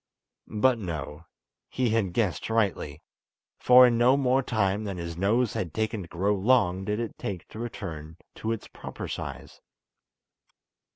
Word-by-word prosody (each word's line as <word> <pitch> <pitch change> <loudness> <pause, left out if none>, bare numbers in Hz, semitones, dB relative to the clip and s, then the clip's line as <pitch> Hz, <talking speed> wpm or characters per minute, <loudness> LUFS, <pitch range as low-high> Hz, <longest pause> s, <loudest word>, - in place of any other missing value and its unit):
But, 120 +3 +2
no! 80 -4 -6 0.4
he 125 -3 0
had 105 -6 0
guessed 100 -2 -1
rightly, 100 -10 -1 0.6
for 125 0 +8
in 120 -2 +2
no 125 +3 +5
more 135 -1 +2
time 105 -4 0
than 100 -3 -4
his 85 -1 -5
nose 105 +6 +1
had 85 -4 -4
taken 110 -1 -1
to 85 - -9
grow 95 +5 0
long 95 -3 +2
did 105 +2 -1
it 115 -2 -5
take 95 -4 -5
to 110 - -10
return 80 -9 -6 0.2
to 110 - -2
its 115 - -4
proper - - -8
size. 70 -3 -7
105 Hz, 155 wpm, -27 LUFS, 90-120 Hz, 0.6 s, for